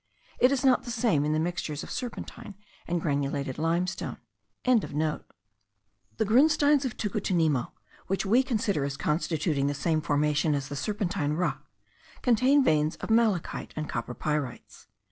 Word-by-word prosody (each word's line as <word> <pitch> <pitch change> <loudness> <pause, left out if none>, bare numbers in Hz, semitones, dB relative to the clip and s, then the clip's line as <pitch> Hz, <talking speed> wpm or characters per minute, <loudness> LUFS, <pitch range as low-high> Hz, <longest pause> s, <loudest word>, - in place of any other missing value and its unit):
It 250 - +5
is 275 0 0
not 260 -1 +5
the - - -9
same 220 - +1
in 150 - 0
the 155 - +1
mixtures 160 -3 -3
of - - -9
serpentine 240 -4 -6 0.3
and 175 0 0
granulated 140 -3 -2
limestone.) 170 +3 -1 0.5
The 160 - +1 1.1
grunsteins 285 +4 +4
of 250 - -4
Tucutunemo, 175 - 0 0.4
which 195 +1 -1
we 230 +7 +4
consider 215 - 0
as 140 0 -3
constituting 155 -3 0
the 145 - -1
same 155 +2 0
formation 150 +1 +1
as 140 -1 -3
the 145 - -5
serpentine 180 - -1
rock, 175 +3 -2 0.6
contain 255 +4 +4
veins 155 -7 +2
of - - -5
malachite 220 -6 +1
and 155 -1 -3
copper 120 -1 -4
pyrites. 150 -5 -4
170 Hz, 145 wpm, -28 LUFS, 150-230 Hz, 1.1 s, It